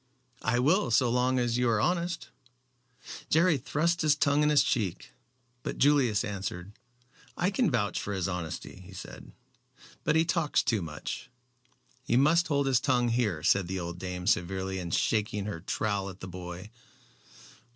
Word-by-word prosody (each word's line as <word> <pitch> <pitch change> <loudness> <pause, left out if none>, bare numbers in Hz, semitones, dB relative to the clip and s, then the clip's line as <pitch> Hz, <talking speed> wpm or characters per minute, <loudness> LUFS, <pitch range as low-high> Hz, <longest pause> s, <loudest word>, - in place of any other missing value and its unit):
"I 110 +2 +1
will 160 +12 +3
so 125 -3 +3
long 125 +1 +2
as 120 -1 +1
you 125 -1 +2
are 110 -2 +2
honest." 170 +4 -1 1.0
Jerry 165 -2 +4
thrust 165 +6 0
his 155 -2 +4
tongue 145 +1 +2
in 150 - +3
his 150 -1 +5
cheek, 105 -8 -2 0.5
but - - -5
Julius 130 -7 +3
answered, 95 -1 -5 0.6
"I 180 +3 +1
can 230 0 +2
vouch 105 -7 0
for 100 - -4
his 95 -3 -1
honesty," 90 0 -5
he 95 +1 -13
said. 90 - -10 0.7
"But 150 - +2
he 160 +1 +4
talks 165 -3 +1
too 110 -4 +1
much." 75 -3 -6 0.7
"He 130 -2 +1
must 160 +6 +4
hold 140 -2 +1
his 130 -3 +3
tongue 125 -3 +1
here," 110 -10 0
said 95 +1 +3
the 95 +1 -3
old 85 0 -5
dame, 90 -1 -5
severely, 95 0 0
and 85 -2 -5
shaking 105 +1 0
her 105 -5 -4
trowel 100 +1 -2
at 95 0 -11
the 95 - -7
boy. 90 +2 -8
115 Hz, 165 wpm, -29 LUFS, 95-145 Hz, 1.0 s, his